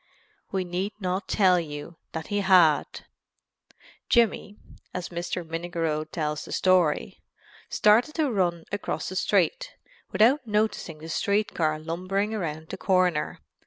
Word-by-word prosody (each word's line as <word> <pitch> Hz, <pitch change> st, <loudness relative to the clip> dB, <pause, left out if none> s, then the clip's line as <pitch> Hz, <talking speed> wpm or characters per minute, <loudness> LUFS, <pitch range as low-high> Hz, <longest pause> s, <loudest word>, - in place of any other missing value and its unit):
We 190 Hz, -1 st, 0 dB
need 180 Hz, +4 st, -3 dB
not 185 Hz, 0 st, -2 dB
tell 185 Hz, -3 st, +4 dB
you 150 Hz, 0 st, -7 dB, 0.2 s
that 160 Hz, -1 st, -4 dB
he 205 Hz, -, +2 dB
had. 180 Hz, -6 st, +3 dB, 1.0 s
"Jimmy," 225 Hz, -3 st, +2 dB, 0.4 s
as 180 Hz, -2 st, -4 dB
Mr. 175 Hz, 0 st, -4 dB
Minnigerode 165 Hz, -2 st, -3 dB
tells 150 Hz, -2 st, -2 dB
the -, -, -10 dB
story, 180 Hz, -5 st, +2 dB, 0.5 s
"started 225 Hz, +8 st, +3 dB
to 305 Hz, -5 st, +1 dB
run 175 Hz, -5 st, 0 dB
across 205 Hz, 0 st, -3 dB
the 185 Hz, -, -7 dB
street, -, -, +1 dB, 0.4 s
without 250 Hz, +4 st, +3 dB
noticing 210 Hz, -6 st, -1 dB
the 155 Hz, +1 st, -10 dB
street 200 Hz, +6 st, 0 dB
car 155 Hz, -2 st, 0 dB
lumbering 185 Hz, +6 st, -2 dB
around 160 Hz, -6 st, -4 dB
the -, -, -5 dB
corner... 180 Hz, -5 st, +1 dB
180 Hz, 130 wpm, -26 LUFS, 165-205 Hz, 1.0 s, tell